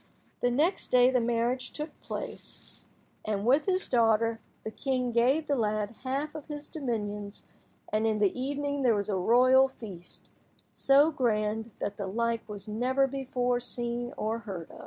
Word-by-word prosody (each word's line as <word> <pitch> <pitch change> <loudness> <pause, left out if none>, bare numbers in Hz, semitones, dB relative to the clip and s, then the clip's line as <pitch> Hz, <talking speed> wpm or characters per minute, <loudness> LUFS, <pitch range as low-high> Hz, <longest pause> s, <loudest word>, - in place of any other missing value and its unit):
The 245 - +3
next 305 +10 +1
day 250 0 +5
the 250 -2 +2
marriage 240 +2 -1
took 300 +1 -5
place, - - -8 0.4
and, 210 -1 -2
with 275 +8 +3
his 375 0 +1
daughter, 230 -1 +2 0.2
the 220 - -5
king 255 0 -1
gave 255 +7 +3
the 285 - +1
lad 215 -3 0
half 275 +3 -2
of 310 -3 -8
his 295 -1 -6
dominions, 210 -7 -4 0.5
and 215 +1 +2
in 215 -1 +1
the 205 -3 +2
evening 285 +2 -2
there 240 -4 +4
was 205 0 -2
a 200 - +1
royal 255 +7 +5
feast, 200 -9 -11 0.4
so 285 +3 +4
grand 220 -5 0
that 205 0 -4
the 200 - -4
like 230 +2 -1
was 205 -1 -7
never 255 +5 +1
before 250 -2 -1
seen 240 0 -2
or 220 +2 -1
hear 195 -7 -7
240 Hz, 160 wpm, -29 LUFS, 215-270 Hz, 0.5 s, day